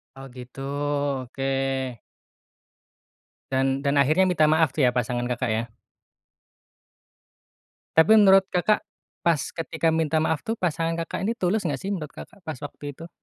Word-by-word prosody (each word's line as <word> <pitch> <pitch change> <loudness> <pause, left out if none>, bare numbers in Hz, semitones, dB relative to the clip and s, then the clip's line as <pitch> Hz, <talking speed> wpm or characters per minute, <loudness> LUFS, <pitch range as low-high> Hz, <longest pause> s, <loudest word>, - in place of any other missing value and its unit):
Oh 135 0 -10
gitu, 125 +2 -10 0.6
oke. 135 +2 -5 2.0
Dan 135 +1 +1
dan 140 0 0
akhirnya 155 +7 +4
minta 175 -4 +2
maaf 155 -2 +3
tuh 145 - +2
ya 125 - +5
pasangan 120 0 -1
Kakak, 125 0 -1
ya? 110 +1 0 2.3
Tapi 185 +7 +7
menurut 195 -3 +7
Kakak, 195 +4 +2 0.4
pas 165 -5 +3
ketika 165 0 -2
minta 160 -1 +1
maaf 160 -1 -1
tuh 225 - -1
pasangan 165 -4 -1
Kakak 180 +3 -4
ini 230 - +1
tulus 190 -1 -1
enggak 140 -5 -2
sih 195 - -4
menurut 160 -7 -4
Kakak, 190 - -13
pas 155 - -3
waktu 145 0 -7
itu? 165 +4 -11
155 Hz, 145 wpm, -25 LUFS, 135-180 Hz, 2.3 s, Tapi